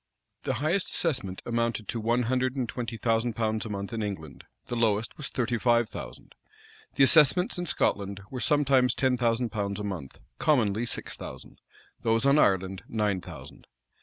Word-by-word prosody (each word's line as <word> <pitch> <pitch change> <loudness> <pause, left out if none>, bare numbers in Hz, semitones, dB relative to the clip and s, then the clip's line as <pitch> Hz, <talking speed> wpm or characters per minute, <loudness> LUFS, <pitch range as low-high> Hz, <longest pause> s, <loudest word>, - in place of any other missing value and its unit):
The - - 0
highest 155 - 0
assessment 130 - -1
amounted 115 -2 -1
to 115 - -2
one 120 +3 +1
hundred 130 +2 0
and 130 -3 -1
twenty 115 0 -5
thousand 115 +1 +1
pounds 110 -1 -1
a - - -5
month 100 +1 -5
in 115 - -2
England; 95 -9 -6 0.2
the 120 - -4
lowest 115 -1 +1
was 150 - -5
thirty 120 -2 -1
five 120 -1 +3
thousand. - - -9 0.6
The 140 - +5
assessments 170 - +5
in 175 - -3
Scotland 100 -7 0
were 130 - -4
sometimes 135 -1 +3
ten 130 -2 +2
thousand 120 -1 0
pounds 100 -2 -2
a - - -4
month;[] 95 -10 -6 0.2
commonly 120 -6 +2
six - - -4
thousand. - - -10 0.4
Those 115 +2 +1
on 140 +2 +5
Ireland 95 -4 +2
nine 105 -4 0
thousand. - - -11
115 Hz, 170 wpm, -28 LUFS, 105-130 Hz, 0.6 s, The